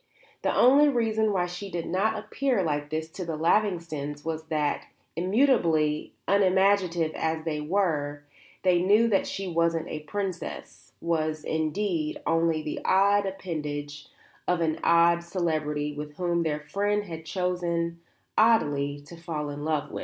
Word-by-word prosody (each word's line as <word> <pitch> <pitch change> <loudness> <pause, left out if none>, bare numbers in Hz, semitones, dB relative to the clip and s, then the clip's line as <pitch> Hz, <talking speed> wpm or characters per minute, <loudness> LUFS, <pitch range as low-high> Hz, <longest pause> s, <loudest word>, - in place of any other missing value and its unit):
The - - +1
only 280 +4 +6
reason 220 -4 +1
why 180 -3 +1
she 180 +3 -6
did 170 -2 -4
not 210 +5 0
appear 255 -8 0
like 145 -2 -2
this 160 +1 -3
to 185 - -6
the 165 -2 -3
Lavingtons 160 -5 0
was 160 -1 -3
that, 155 -2 -1 0.3
immutably 170 - +2
unimaginative 190 -4 +3
as 160 0 -2
they 150 -2 -2
were, 150 -4 -1 0.4
they 180 -2 +4
knew 210 +5 +4
that 195 -3 +2
she 195 -1 -4
wasn't 165 -1 0
a 155 - -4
princess, 185 +3 -6
was, 155 -2 -1
indeed, 160 0 -1
only 165 -1 +1
the 150 - -4
odd 200 +1 +3
appendage 150 -6 -5 0.4
of 180 -1 +2
an 160 -1 0
odd 170 0 +4
celebrity 155 -4 -1
with 150 0 -7
whom 175 0 0
their 150 -2 -1
friend 205 +7 0
had 165 -4 -8
chosen, 170 -1 -2 0.4
oddly, 145 -11 +3
to 145 +4 -12
fall 155 -3 -4
in 145 +1 -6
love. 155 -2 -1
170 Hz, 145 wpm, -27 LUFS, 155-190 Hz, 0.4 s, only